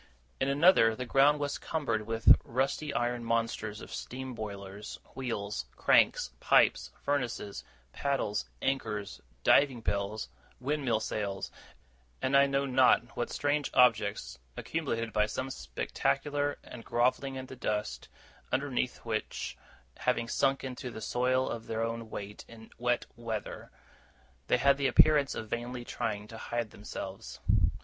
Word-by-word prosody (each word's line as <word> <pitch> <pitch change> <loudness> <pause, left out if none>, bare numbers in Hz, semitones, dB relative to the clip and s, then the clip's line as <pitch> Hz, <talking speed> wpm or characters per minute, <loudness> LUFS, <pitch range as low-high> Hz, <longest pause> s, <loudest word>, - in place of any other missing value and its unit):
In 135 - +1
another, 140 -6 +5
the 125 - -4
ground 140 +4 +4
was 145 -1 -2
cumbered 115 -9 -2
with 115 0 +7
rusty 135 +4 -1
iron 120 -1 -1
monsters 115 -2 -1
of - - -9
steam 130 +1 -5
boilers, 100 -2 -7 0.2
wheels, 105 - -3
cranks, 65 - +4
pipes, - - +4
furnaces, 125 -8 -2 0.3
paddles, 135 - -1 0.2
anchors, 105 -7 -2 0.2
diving 135 -4 +5
bells, 100 0 -2 0.3
windmill 130 -4 0
sails, 100 -3 -3 0.7
and 130 +1 +1
I 140 0 +7
know 140 0 +1
not 125 -2 +4
what 120 - -2
strange 145 0 0
objects, 105 - +3 0.2
accumulated 115 -9 -2
by 105 -1 +3
some 130 +5 -3
speculator, 145 - -1
and 115 - -10
grovelling 130 +3 +1
in 130 0 -5
the 130 - -9
dust, 105 - -3 0.4
underneath 130 -3 -1
which 110 -2 -3 0.4
having 115 - 0
sunk 135 +3 +1
into 130 0 -5
the 115 - -7
soil 130 +3 +1
of 115 -1 -5
their 115 0 -1
own 115 0 -3
weight 105 0 -7
in 110 -1 -13
wet 120 0 +1
weather 115 -2 -5 0.8
they - - +4
had 140 +2 +4
the 140 -1 +2
appearance 145 +2 +5
of 110 - -5
vainly 120 +2 -4
trying 105 -4 -3
to 110 - -9
hide 120 -2 -3
themselves. 95 -2 -7
120 Hz, 135 wpm, -31 LUFS, 110-135 Hz, 0.8 s, with